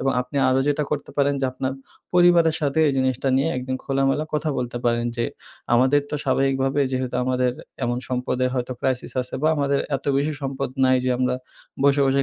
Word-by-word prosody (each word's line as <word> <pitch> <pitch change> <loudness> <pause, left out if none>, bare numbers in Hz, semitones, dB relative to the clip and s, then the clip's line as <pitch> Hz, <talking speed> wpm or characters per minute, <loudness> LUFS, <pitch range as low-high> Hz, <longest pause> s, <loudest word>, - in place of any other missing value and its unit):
এবং 135 - +1
আপনি 125 +3 -6
আরো 130 +1 +3
যেটা 145 +1 +1
করতে 150 -1 -3
পারেন 140 0 +2
যে 135 - +1
আপনার 130 +1 -3 0.4
পরিবারের 175 -2 +5
সাথে 145 0 0
এই 140 - +1
জিনিসটা 130 0 0
নিয়ে 140 +4 +2
একদিন 130 +1 -3
খোলামেলা 135 +2 +1
কথা 150 +1 0
বলতে 120 -1 -3
পারেন। 120 0 +1
যে 120 - 0 0.5
আমাদের 130 +4 +4
তো - - -2
স্বাভাবিকভাবে 135 +1 +1
যেহেতু 130 -1 -2
আমাদের 125 -1 +1 0.3
এমন 120 +1 -1
সম্পদে 125 0 -1
হয়তোবা 125 0 -3
ক্রাইসিস 130 -2 -1
আছে 125 - -9
বা 155 - +4
আমাদের 140 -1 +1 0.2
এত - - -13
বেশি 145 +2 +1
সম্পদ 135 0 -2 0.2
নাই 130 0 +4
যে 130 - +1
আমরা 125 0 +1 0.5
বসে, 140 0 +4
বসে 135 +1 +2
135 Hz, 190 wpm, -23 LUFS, 125-140 Hz, 0.5 s, পরিবারের